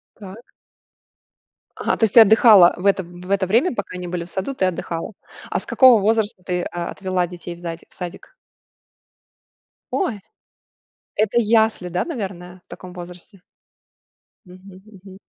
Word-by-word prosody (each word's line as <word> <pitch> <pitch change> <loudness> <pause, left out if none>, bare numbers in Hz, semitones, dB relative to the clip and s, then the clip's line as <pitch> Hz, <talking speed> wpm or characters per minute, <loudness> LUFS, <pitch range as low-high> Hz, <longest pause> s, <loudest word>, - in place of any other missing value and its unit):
Так. 205 +3 -13 1.2
Ага, - - -1
то - - +2
есть, 215 - -1
ты 235 - +10
отдыхала 215 -4 +7
в 180 - -9
это 195 -1 +3
в 175 +1 -12
это 200 -1 +1
время, 235 - +2
пока 205 -4 -5
они 180 0 -6
были 175 -1 -4
в 175 - -8
саду, 195 +10 -3
ты 190 - 0
отдыхала. 170 +1 -4 0.4
А - - 0
с - - -6
какого 255 -4 +6
возраста 210 -2 0
ты, 180 -1 -2
а, 175 0 -5
отвела 185 -2 -2
детей 175 0 -9
в - - -15
задик 170 -1 -8
в - - -14
садик? 180 - -9 1.6
Ой, 280 - -2 1.0
это 215 +2 0
ясли, 220 -4 +2
да, 175 +1 -2
наверное, 185 - -7
в - - -61
таком 180 -1 -11
возрасте? 180 +2 -12 1.0
Мгм 185 +1 -15
мгм. 190 -1 -14
190 Hz, 155 wpm, -21 LUFS, 180-215 Hz, 1.6 s, ты